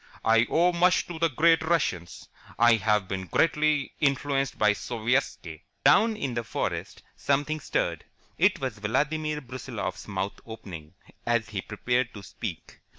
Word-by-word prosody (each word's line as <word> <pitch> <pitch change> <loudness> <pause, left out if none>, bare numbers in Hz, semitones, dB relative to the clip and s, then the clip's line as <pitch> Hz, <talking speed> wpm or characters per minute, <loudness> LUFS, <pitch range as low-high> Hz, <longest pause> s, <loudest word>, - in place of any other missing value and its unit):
I 115 +1 +4
owe 175 +2 +3
much 180 +1 +3
to 170 -2 -7
the 165 0 +3
great 165 +5 +4
Russians. 135 - -1 0.3
I 120 0 +6
have 105 -2 +1
been 95 -1 -4
greatly 150 - +1
influenced 140 -1 0
by 105 -1 +4
Sovietski." 115 - -2 0.2
Down 225 0 +5
in 135 - -3
the 120 0 -2
forest 115 - -4
something 145 +2 0
stirred. - - -2 0.3
It - - +3
was 130 -6 -4
Vladimir 150 +7 -1
Brusiloff's 130 -2 -6
mouth 100 0 -3
opening, 95 -9 -10 0.3
as 120 -3 0
he 100 -2 -3
prepared 125 +4 -1
to 100 - -9
speak. - - -7
125 Hz, 145 wpm, -27 LUFS, 105-155 Hz, 0.3 s, I